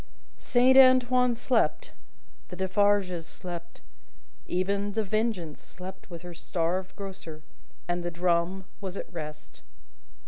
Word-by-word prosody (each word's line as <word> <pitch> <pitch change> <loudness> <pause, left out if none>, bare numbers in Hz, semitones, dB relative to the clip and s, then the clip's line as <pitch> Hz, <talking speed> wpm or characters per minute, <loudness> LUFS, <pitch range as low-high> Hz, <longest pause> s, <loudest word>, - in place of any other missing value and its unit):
Saint 255 +1 +4
Antoine 255 -1 +5
slept, 250 - +1 0.6
the 180 - -7
Defarges 190 -2 +2
slept: 175 -2 -8 0.7
even 200 +3 0
The 220 +1 +1
Vengeance 210 -7 -1
slept 185 +1 -10
with 170 -1 -8
her 175 -1 -8
starved 180 +2 -2
grocer, 185 -6 -8 0.4
and 175 0 -1
the 175 - -1
drum 175 +2 0
was 195 -1 -5
at - - -7
rest. 155 -2 -8
185 Hz, 115 wpm, -28 LUFS, 175-210 Hz, 0.7 s, Antoine